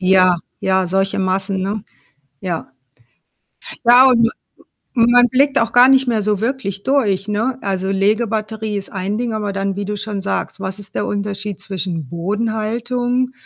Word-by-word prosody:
Ja, 185 -1 +4 0.2
ja, 190 -1 +1
solche 195 +2 0
Massen, 190 0 0
ne? 205 +1 -3 0.6
Ja. 170 -6 -4 1.2
Ja, 250 +2 +8
und 230 -2 +4 0.7
und 235 0 +4
ma 245 - +7
man 245 - +5
blickt 275 +3 +2
auch 230 0 0
gar 245 +1 +7
nicht 265 -1 +4
mehr 225 -3 +1
so 210 0 0
wirklich 225 -6 -3
durch, 215 -8 +1
ne? 225 +5 -1
Also, 190 -1 -2
Legebatterie 215 +1 -1
ist 195 - -6
ein 195 +2 -3
Ding, 240 -2 -2
aber 205 -2 -2
dann, 195 0 -2
wie 200 0 -3
du 210 +1 -3
schon 205 -1 -4
sagst: 195 - -3
Was 190 0 -4
ist 200 - -10
der 205 - -1
Unterschied 205 -1 -3
zwischen 175 -7 -4
Bodenhaltung 230 +6 -1
210 Hz, 165 wpm, -18 LUFS, 195-235 Hz, 1.2 s, Ja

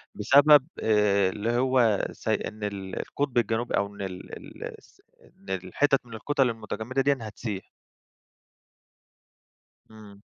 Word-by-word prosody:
بسبب 140 +6 +6
آآ، 105 -3 +3
اللي 105 +4 -2
هو 125 -5 +3
س - - -13
إن 105 0 -2
ال 100 -2 -4
القطب 140 -4 -3
الجنوبي 115 +1 +1
أو 100 - +1
إن 100 - -9
ال 90 -2 -7
ال - - -11
الس - - -23 0.2
إن - - -19
الحتت 110 +10 0
من 115 - -13
الكتل 135 +3 +1
المتجمدة 110 +3 -3
ديَّة 140 0 +2
هتسيح. 105 -2 -6 2.2
إمم. 105 -2 -14
110 Hz, 130 wpm, -27 LUFS, 100-130 Hz, 2.2 s, بسبب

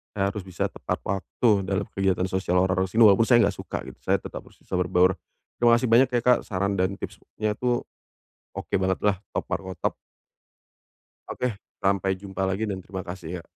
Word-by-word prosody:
Saya 100 -1 +1
harus 100 -3 -7
bisa 90 - -2
tepat - - -3
waktu 100 +5 -1 0.2
dalam 100 +1 0
kegiatan 95 -2 +1
sosial 95 -1 0
orang-orang 95 0 +1
sini 110 +5 +4
walaupun 105 +2 +6
saya 120 -3 +6
enggak 100 -2 +1
suka - - -5
gitu, - - -11
saya - - +1
tetap - - -5
bisa - - -21
bisa - - -4
berbaur. 90 0 +4 0.5
Terima 120 0 +6
kasih 120 +1 +1
banyak 125 +3 +6
ya 120 - +2
Kak 125 -1 +5
saran 100 0 -1
dan 95 +1 +1
tipsnya 110 +2 -5
tuh 125 -1 +1 0.7
oke - - -6
banget 95 0 +1
lah 105 -3 +2 0.2
top - - -1
markotop. 95 -2 -2 1.4
Oke. 125 -5 -2 0.2
Sampai 95 -1 +2
jumpa 95 0 -4
lagi 95 +4 -1
dan 95 -1 -4
terima 95 +1 -6
kasih 90 -1 -6
ya. - - -26
95 Hz, 185 wpm, -25 LUFS, 95-110 Hz, 1.4 s, walaupun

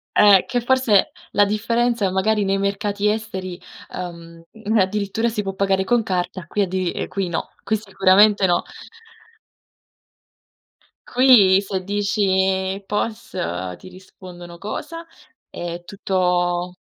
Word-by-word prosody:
Eh, 200 -3 +6
che 245 - -1
forse 240 -5 +2 0.2
la 205 0 +4
differenza, 230 0 0
magari 205 +3 +1
nei 195 0 0
mercati 200 +1 -1
esteri, 190 -5 -4 0.4
uhm, 170 -2 -8 0.3
addirittura 205 +4 0
si 215 -2 -2
può 195 -1 -4
pagare 195 -1 0
con 240 0 +2
carta, 180 -3 -3
qui 205 +3 0
addi 185 -1 -2
ehm, - - -4
qui 195 -3 -3
no, 165 - -4
qui 220 - 0
sicuramente 200 0 +4
no. 175 -1 +2 2.4
Qui 240 -7 +6
se 195 -1 -3
dici: 195 -1 0
"Pos?", 215 +1 -3 0.4
ti - - -12
rispondono: 180 -2 -12
"Cosa?" 330 +10 -6 0.4
È 175 0 -6
tutto 180 -2 -1
195 Hz, 115 wpm, -21 LUFS, 185-210 Hz, 2.4 s, Eh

